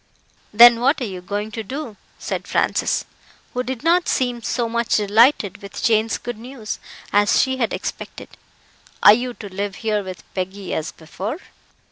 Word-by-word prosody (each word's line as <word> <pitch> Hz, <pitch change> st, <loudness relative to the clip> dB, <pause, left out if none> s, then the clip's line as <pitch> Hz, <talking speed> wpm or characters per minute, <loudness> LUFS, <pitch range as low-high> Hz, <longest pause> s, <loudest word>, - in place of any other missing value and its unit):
"Then 235 Hz, +2 st, +8 dB
what 275 Hz, +5 st, +2 dB
are -, -, -3 dB
YOU 185 Hz, -4 st, -6 dB
going 205 Hz, +3 st, -4 dB
to 225 Hz, -, -4 dB
do?" 255 Hz, +1 st, -6 dB, 0.2 s
said -, -, -4 dB
Francis, -, -, 0 dB, 0.5 s
who 250 Hz, -, -1 dB
did 255 Hz, 0 st, -5 dB
not 345 Hz, +2 st, +3 dB
seem 245 Hz, -2 st, 0 dB
so 235 Hz, +3 st, -1 dB
much 235 Hz, 0 st, 0 dB
delighted 215 Hz, 0 st, +3 dB
with 200 Hz, -, -8 dB
Jane's 220 Hz, 0 st, +2 dB
good 240 Hz, -2 st, -7 dB
news 240 Hz, -2 st, -7 dB, 0.3 s
as 205 Hz, 0 st, +4 dB
she 260 Hz, -1 st, +1 dB
had 235 Hz, -4 st, 0 dB
expected. -, -, -6 dB, 0.7 s
"Are 205 Hz, -, +10 dB
you 245 Hz, +2 st, -2 dB
to 205 Hz, -, -9 dB
live 200 Hz, 0 st, -3 dB
here 210 Hz, -1 st, +1 dB
with 185 Hz, -2 st, -8 dB
Peggy, 190 Hz, +1 st, -4 dB
as 160 Hz, -, -3 dB
before?" 195 Hz, -, -6 dB
225 Hz, 165 wpm, -21 LUFS, 205-245 Hz, 0.7 s, Are